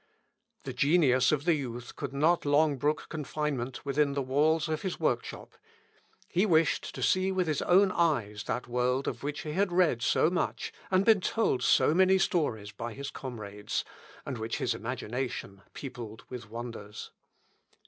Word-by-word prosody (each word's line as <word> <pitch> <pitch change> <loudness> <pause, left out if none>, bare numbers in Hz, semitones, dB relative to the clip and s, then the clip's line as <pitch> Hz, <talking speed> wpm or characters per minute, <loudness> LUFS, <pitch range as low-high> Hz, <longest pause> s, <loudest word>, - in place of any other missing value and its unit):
The - - -5
genius 140 -5 +4
of 150 -1 0
the 175 - +4
youth 120 -5 -5
could 140 -3 -5
not 155 +5 +2
long 145 0 +3
brook 150 +4 0
confinement 145 -5 -3
within 140 0 +1
the 140 - -1
walls 155 +5 +2
of 155 -1 -2
his 190 -2 -4
workshop. 125 -7 -2 0.7
He 185 - +1
wished 165 -6 +2
to - - -4
see 185 +1 +2
with 185 -1 +1
his 155 -3 -1
own 190 +2 +4
eyes 115 - 0
that 125 - -3
world 125 +2 0
of 120 - -3
which 145 +1 -3
he 150 - -5
had 190 +4 +1
read 175 -9 +3
so 155 +6 +3
much, 180 - -2 0.2
and 185 +1 +3
been 220 -4 +5
told 200 - +1
so 150 - +4
many 190 +2 +5
stories 145 - 0
by 115 +3 -6
his 140 0 -6
comrades, 105 -5 -5 0.4
and 130 -4 -4
which 110 +1 -3
his 120 - 0
imagination 115 -3 -4
peopled 115 -5 -8
with 125 -4 -8
wonders. 115 -3 -7
140 Hz, 165 wpm, -29 LUFS, 120-165 Hz, 0.7 s, been